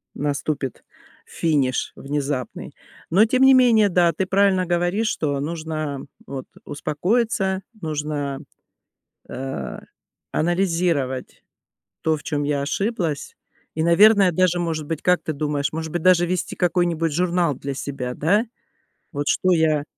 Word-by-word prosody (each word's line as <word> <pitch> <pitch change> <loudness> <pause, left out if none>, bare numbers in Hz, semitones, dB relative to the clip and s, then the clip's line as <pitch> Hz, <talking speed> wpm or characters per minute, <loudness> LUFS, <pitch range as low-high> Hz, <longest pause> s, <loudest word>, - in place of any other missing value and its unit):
наступит 145 -2 -3 0.4
финиш 140 -6 0
внезапный. 140 -2 -4 0.4
Но 195 +6 +5
тем 255 +3 +2
не 265 0 +8
менее, 235 -5 +5
да, 175 -2 +3
ты 190 - -1
правильно 190 -1 +2
говоришь, 175 +5 0
что 145 -3 -1
нужно 155 -2 -4 0.2
вот 135 -2 -6 0.2
успокоиться, 190 +6 0 0.2
нужно, 150 -3 -3 0.9
э-э, 135 +1 -5 0.5
анализировать 165 -6 0 0.6
то, 160 -1 +1
в - - -14
чём 145 -1 -2
я 145 -1 0
ошиблась 170 - -2 0.4
и, 160 - 0
наверное, 195 +3 +6
даже, 180 +1 +2
может 160 -3 -2
быть, 160 0 -4
как 180 0 +2
ты 155 - -3
думаешь, 145 0 -1
может 160 0 -4
быть 175 - -2
даже 180 -1 +5
вести 180 0 -2
какой-нибудь 175 -3 +1
журнал 175 -2 +1
для 140 +2 -5
себя? 130 -2 -4
Да? 205 +9 +2 0.7
Вот 145 0 -2
что 185 - +2
я 155 -3 +2
160 Hz, 130 wpm, -22 LUFS, 145-185 Hz, 0.9 s, не